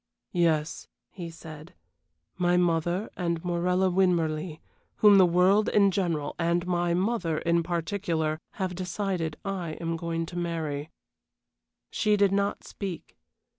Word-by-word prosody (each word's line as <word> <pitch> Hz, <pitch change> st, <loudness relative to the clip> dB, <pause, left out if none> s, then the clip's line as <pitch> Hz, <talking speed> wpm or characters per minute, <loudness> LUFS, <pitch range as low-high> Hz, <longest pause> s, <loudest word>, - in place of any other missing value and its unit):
"Yes," 160 Hz, -3 st, 0 dB, 0.2 s
he 175 Hz, -3 st, -7 dB
said, 160 Hz, -1 st, -11 dB, 0.6 s
"my 180 Hz, 0 st, +2 dB
mother 175 Hz, +3 st, 0 dB
and 170 Hz, -2 st, -2 dB
Morella 180 Hz, +2 st, +1 dB
Winmarleigh, 170 Hz, -3 st, +1 dB, 0.4 s
whom 205 Hz, -2 st, +6 dB
the 185 Hz, -, +7 dB
world 185 Hz, +5 st, +4 dB
in 200 Hz, -2 st, +4 dB
general 170 Hz, -6 st, -1 dB
and 170 Hz, +1 st, +1 dB
my 175 Hz, -1 st, +1 dB
mother 185 Hz, -4 st, 0 dB
in 170 Hz, +1 st, +1 dB
particular 165 Hz, -2 st, -2 dB
have 185 Hz, -1 st, -3 dB
decided 180 Hz, -3 st, -3 dB
I 185 Hz, -5 st, -3 dB
am 165 Hz, +1 st, -3 dB
going 165 Hz, 0 st, -2 dB
to 175 Hz, -, -10 dB
marry." 160 Hz, -3 st, -3 dB, 1.0 s
She 210 Hz, -2 st, +2 dB
did 200 Hz, -1 st, +4 dB
not 200 Hz, 0 st, 0 dB
speak. 190 Hz, -5 st, -7 dB
175 Hz, 130 wpm, -27 LUFS, 165-190 Hz, 1.0 s, the